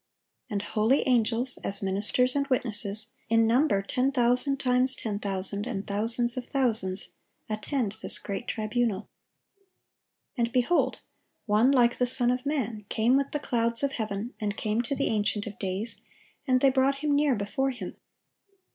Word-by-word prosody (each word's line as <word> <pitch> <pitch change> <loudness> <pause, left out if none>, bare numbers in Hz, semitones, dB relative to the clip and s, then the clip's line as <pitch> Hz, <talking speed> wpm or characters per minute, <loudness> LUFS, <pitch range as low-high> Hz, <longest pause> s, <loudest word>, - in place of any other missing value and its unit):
And 205 -1 -2
holy 225 +9 +1
angels, 245 +1 +1
as 200 0 -1
ministers 205 +7 +2
and 280 0 0
witnesses, 220 -4 0 0.2
in 225 0 +4
number 230 -3 +2
"ten 255 +6 0
thousand 250 +2 +2
times 255 0 +4
ten 210 -4 -4
thousand, 200 +1 -2
and 205 -5 -4
thousands 230 +4 +1
of 250 - -4
thousands," 220 -8 +1 0.4
attend 215 0 -2
this - - 0
great 200 +4 -5
tribunal. 215 -2 -1 1.3
"And, 235 -2 0
behold, 255 +8 +1 0.4
one 215 +4 +3
like 245 -3 +3
the 250 - +2
Son 245 -1 +2
of 250 +2 -3
man 230 -8 -2
came 235 +3 +2
with 275 0 0
the - - -1
clouds 235 -3 +1
of 280 - +1
heaven, 220 -1 -4
and 205 -2 -3
came 215 +2 0
to 265 +4 -3
the 275 - 0
Ancient 210 -1 0
of 210 -2 -8
days, 195 +4 -4 0.5
and 255 -1 +3
they 275 - +5
brought 275 +2 +1
Him 290 -1 +2
near 285 -2 +3
before 210 +6 -1
Him. 235 -8 -6
235 Hz, 160 wpm, -27 LUFS, 210-255 Hz, 1.3 s, they